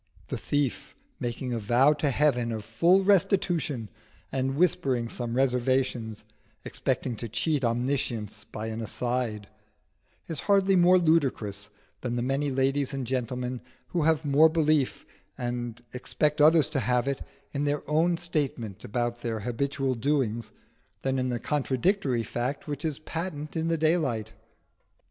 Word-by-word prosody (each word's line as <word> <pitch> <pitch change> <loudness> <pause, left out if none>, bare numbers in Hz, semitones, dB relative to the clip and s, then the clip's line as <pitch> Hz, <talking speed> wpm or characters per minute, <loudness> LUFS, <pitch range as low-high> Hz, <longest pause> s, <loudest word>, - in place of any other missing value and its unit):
The - - -2
thief 145 -3 -1 0.2
making 120 +1 -3
a 115 - -1
vow 120 +7 +4
to 145 -1 0
heaven 125 -4 +2
of 110 -2 -4
full 170 - +4
restitution 175 - +2 0.4
and 135 0 -1
whispering 135 -7 +1
some 120 0 -4
reservations, 125 -4 0 0.4
expecting 120 - -2
to 115 - -4
cheat 140 +6 0
Omniscience 115 -4 -1
by 110 - -6
an 110 +1 -4
"aside," 115 -2 -2 0.8
is 160 -4 -5
hardly 195 -1 +5
more 180 +1 +6
ludicrous 130 - +1 0.3
than 120 -1 -2
the 120 - -1
many 135 +3 0
ladies 135 +1 +1
and 135 -2 -3
gentlemen 125 0 -2 0.3
who 175 - 0
have 160 0 +2
more 145 +3 +6
belief, 155 -4 +1 0.3
and 120 -1 -4
expect 150 +4 0
others 155 -1 +6
to 145 - 0
have 125 +1 +1
it, 140 -1 -1 0.3
in 145 0 -1
their 145 0 -1
own 165 +3 +2
statement 140 - -2
about 120 +2 -2
their 115 -2 -3
habitual 135 +4 -1
doings 120 -3 0 0.5
than 135 0 0
in 130 0 0
the 120 - -1
contradictory 140 - +1
fact 125 +7 -3
which 145 -1 -4
is 155 -4 -1
patent 155 -1 -5
in 160 0 0
the 165 0 +1
daylight. 145 -9 +1
135 Hz, 145 wpm, -27 LUFS, 120-150 Hz, 0.8 s, more